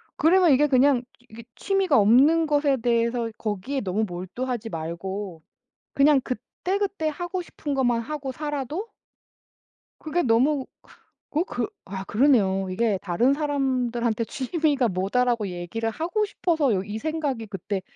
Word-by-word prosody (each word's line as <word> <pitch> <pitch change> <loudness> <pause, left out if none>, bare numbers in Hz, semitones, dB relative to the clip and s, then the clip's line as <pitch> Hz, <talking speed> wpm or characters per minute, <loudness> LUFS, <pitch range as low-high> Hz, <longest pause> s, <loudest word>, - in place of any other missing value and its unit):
그러면 350 +1 +4
이게 290 +2 +4
그냥 260 -1 +4 0.3
이게 230 +1 -11
취미가 390 -6 +2
없는 265 +10 +5
것에 290 -2 +2
대해서 235 0 0
거기에 225 +6 -3
너무 205 +2 -1
몰두하지 225 +7 -4
말고 170 +2 -5 0.5
그냥 280 0 +5
그때그때 360 - -3
하고 350 +4 -4
싶은 290 -4 -5
것만 245 -3 +2
하고 280 +2 -5
살아도 295 - -4 1.1
그게 325 +3 -1
너무 260 +4 +2 0.6
그 310 - 0
어 - - +2
그 - - -3 0.2
아 190 0 -6
그러네요. 200 -6 +2
이게 210 +2 +1
다른 230 +9 +2
사람들한테 255 -6 0
"취미가 280 0 0
뭐다."라고 210 +4 0
얘기를 180 +6 -3
하고 345 - -1
싶어서 320 - 0
여 185 - +1
이 205 +2 -5
생각이 290 -6 -2
그때 195 0 -4
255 Hz, 300 characters per minute, -25 LUFS, 215-300 Hz, 1.1 s, 없는